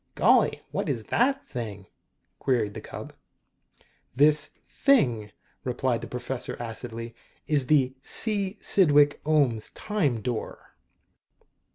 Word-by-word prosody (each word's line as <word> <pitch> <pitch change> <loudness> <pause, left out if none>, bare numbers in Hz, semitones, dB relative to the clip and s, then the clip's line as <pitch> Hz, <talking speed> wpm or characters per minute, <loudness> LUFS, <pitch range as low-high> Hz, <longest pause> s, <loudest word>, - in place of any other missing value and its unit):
"Golly, - - +3
what's 115 - -2
that 270 - +1
thing?" 105 -6 -6 0.5
queried 120 -6 0
the - - -7
cub. - - -9 1.0
"This 150 +3 +4 0.2
thing," 120 - +2 0.3
replied 125 -1 -1
the - - -6
professor 125 +1 -4
acidly, 115 0 -6 0.2
" - - -37
is 135 -3 +1
the 135 -4 +3
C. 205 +3 +1
Cydwick 145 -6 +4
Ohms 140 -8 +2
Time 150 - -1
Door." 120 -1 -5
130 Hz, 105 wpm, -26 LUFS, 115-155 Hz, 1.0 s, This